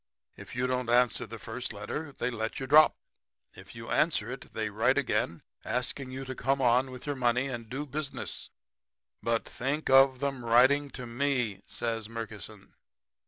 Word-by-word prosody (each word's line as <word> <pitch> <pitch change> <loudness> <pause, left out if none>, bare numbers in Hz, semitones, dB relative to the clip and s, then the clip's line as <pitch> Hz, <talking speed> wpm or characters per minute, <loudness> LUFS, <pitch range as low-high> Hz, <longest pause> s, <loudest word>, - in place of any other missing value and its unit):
'If - - -11
you 125 +1 0
don't 125 -1 -1
answer 120 -1 +3
the 115 - -7
first 115 +3 -4
letter 130 +9 -5
they 125 -2 -2
let 110 -1 -3
you 135 - -3
drop. 155 +3 +7 0.6
If - - -13
you - - -8
answer - - +2
it - - -8
they - - -3
write - - +2
again 80 0 0 0.2
asking 125 +2 -2
you 130 +1 -6
to 130 - -4
come 135 +1 0
on 125 +1 +3
with 125 -1 -9
your 145 -1 -2
money 125 0 +2
and 115 -3 -6
do 135 +4 -3
business.' 145 0 -5 0.7
"'But 115 -1 0
think 140 +3 -2
of 135 0 +6
'em 135 -3 -2
writing 130 +5 +5
to 125 - -6
ME!' 120 -5 -1
says 115 -2 -3
Murkison. 110 -4 -8
125 Hz, 170 wpm, -29 LUFS, 115-135 Hz, 0.7 s, drop